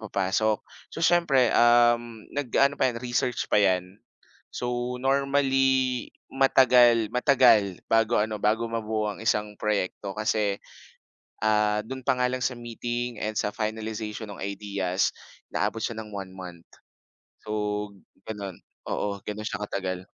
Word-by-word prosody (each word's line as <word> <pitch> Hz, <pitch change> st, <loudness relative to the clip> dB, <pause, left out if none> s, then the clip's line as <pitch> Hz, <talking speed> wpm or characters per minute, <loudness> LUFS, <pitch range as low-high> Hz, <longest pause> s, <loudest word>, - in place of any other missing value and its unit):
papasok. 105 Hz, +1 st, 0 dB, 0.2 s
So, 165 Hz, -, -3 dB
siyempre, 145 Hz, -9 st, +4 dB
um, 120 Hz, -1 st, +3 dB
nag-aano 140 Hz, +1 st, +1 dB
pa -, -, +4 dB
yan, 120 Hz, -, -4 dB
research 120 Hz, 0 st, -1 dB
pa 105 Hz, -, +2 dB
yan. 95 Hz, 0 st, 0 dB, 0.5 s
So, 125 Hz, 0 st, -3 dB
normally, 135 Hz, -1 st, +1 dB, 0.2 s
matagal 125 Hz, -4 st, +5 dB
matagal 125 Hz, -7 st, +4 dB
bago 115 Hz, +1 st, +2 dB
ano, 105 Hz, -1 st, -2 dB
bago 110 Hz, +2 st, +1 dB
mabuo 110 Hz, -2 st, -2 dB
ang -, -, -12 dB
isang 105 Hz, -2 st, 0 dB
proyekto 100 Hz, -1 st, -2 dB
kasi, 105 Hz, -2 st, 0 dB, 0.9 s
ah, 105 Hz, -1 st, +2 dB
do'n 130 Hz, +2 st, -6 dB
pa 130 Hz, 0 st, +1 dB
nga 125 Hz, -, +3 dB
lang 130 Hz, 0 st, -3 dB
sa 125 Hz, -1 st, -1 dB
meeting 120 Hz, 0 st, -4 dB
and 110 Hz, 0 st, -2 dB
sa 105 Hz, 0 st, -1 dB
finalization 110 Hz, 0 st, -4 dB
ng 95 Hz, -, -9 dB
ideas, 100 Hz, -2 st, -1 dB, 0.4 s
inaabot 115 Hz, -, 0 dB
siya 115 Hz, -2 st, -3 dB
ng 105 Hz, -, -12 dB
1 95 Hz, -2 st, -6 dB
month. 90 Hz, -3 st, -10 dB, 0.8 s
So, 105 Hz, -, -8 dB, 0.8 s
gano'n, 100 Hz, -4 st, -6 dB, 0.4 s
oo, 100 Hz, -1 st, -2 dB
gano'n 105 Hz, 0 st, -4 dB
siya 105 Hz, -, -4 dB
katagal. 95 Hz, -2 st, -4 dB
110 Hz, 135 wpm, -26 LUFS, 105-125 Hz, 0.9 s, matagal